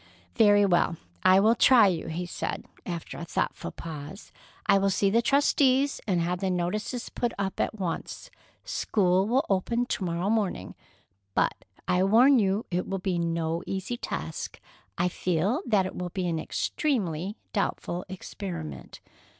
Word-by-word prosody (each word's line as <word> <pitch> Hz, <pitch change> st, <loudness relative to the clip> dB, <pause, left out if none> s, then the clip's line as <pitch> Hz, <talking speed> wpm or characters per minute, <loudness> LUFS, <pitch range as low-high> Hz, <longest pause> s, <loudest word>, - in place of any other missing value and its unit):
"Very 205 Hz, -3 st, +5 dB
well, 175 Hz, -3 st, +2 dB, 0.2 s
I 185 Hz, +1 st, +6 dB
will 220 Hz, +3 st, +5 dB
try 235 Hz, -1 st, +6 dB
you," 175 Hz, -5 st, 0 dB
he 165 Hz, +2 st, -3 dB
said, 175 Hz, -, -4 dB, 0.2 s
after 170 Hz, -3 st, -5 dB
a -, -, -5 dB
thoughtful -, -, -2 dB
pause. 155 Hz, +3 st, -8 dB, 0.3 s
"I 200 Hz, -2 st, +5 dB
will 195 Hz, 0 st, +2 dB
see 195 Hz, 0 st, +2 dB
the 230 Hz, +3 st, +4 dB
trustees 275 Hz, +1 st, +3 dB
and 185 Hz, -4 st, +2 dB
have 175 Hz, +1 st, -1 dB
the 190 Hz, 0 st, -1 dB
notices 210 Hz, +7 st, -2 dB
put 240 Hz, -1 st, -2 dB
up 195 Hz, -1 st, -3 dB
at -, -, 0 dB
once. 185 Hz, -5 st, -5 dB, 0.3 s
School 190 Hz, -2 st, +1 dB
will 260 Hz, +6 st, +2 dB
open 230 Hz, +5 st, +1 dB
to 210 Hz, -, -3 dB
morrow 175 Hz, +3 st, -1 dB
morning. 200 Hz, -, -1 dB, 0.6 s
But -, -, +3 dB, 0.3 s
I 180 Hz, -, +2 dB
warn 240 Hz, +7 st, +6 dB
you 200 Hz, +1 st, +1 dB
it 180 Hz, +1 st, -1 dB
will 195 Hz, -, -2 dB
be 185 Hz, -2 st, -1 dB
no 165 Hz, 0 st, -1 dB
easy 195 Hz, +5 st, -3 dB
task. 240 Hz, -, -5 dB, 0.4 s
I 175 Hz, -, +2 dB
feel 180 Hz, -, 0 dB
that 205 Hz, -5 st, +3 dB
it 185 Hz, -, -5 dB
will 180 Hz, 0 st, -4 dB
be 185 Hz, +1 st, -3 dB
an 165 Hz, -2 st, -1 dB
extremely 195 Hz, -, -1 dB, 0.2 s
doubtful 180 Hz, -3 st, -2 dB
experiment." 180 Hz, -3 st, -7 dB
190 Hz, 160 wpm, -27 LUFS, 175-220 Hz, 0.6 s, I